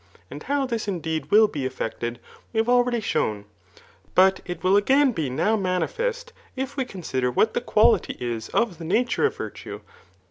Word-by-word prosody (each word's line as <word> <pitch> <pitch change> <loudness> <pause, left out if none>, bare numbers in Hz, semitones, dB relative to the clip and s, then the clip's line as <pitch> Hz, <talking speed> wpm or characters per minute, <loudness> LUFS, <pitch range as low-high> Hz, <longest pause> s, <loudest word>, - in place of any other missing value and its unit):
And 145 +2 -8
how 280 - 0
this 230 -4 -3
indeed 160 -5 -3
will 215 +3 +6
be 150 -9 -5
effected 120 -2 -4 0.3
we 225 - -6
have 225 +1 +2
already 245 -1 +3
shown; 105 - -1 0.7
but 190 +1 +5
it 175 -2 -6
will 185 +2 +4
again 270 +7 +4
be 160 - -2
now 160 +12 +1
manifest, 450 - -2 0.2
if 265 +1 -4
we 265 -2 -1
consider 135 - -2
what 215 - +2
the - - -1
quality 230 -1 +3
is 120 -2 -4
of 225 -8 0
the - - -7
nature 230 - +1
of - - -7
virtue. - - -7
205 Hz, 175 wpm, -24 LUFS, 155-245 Hz, 0.7 s, will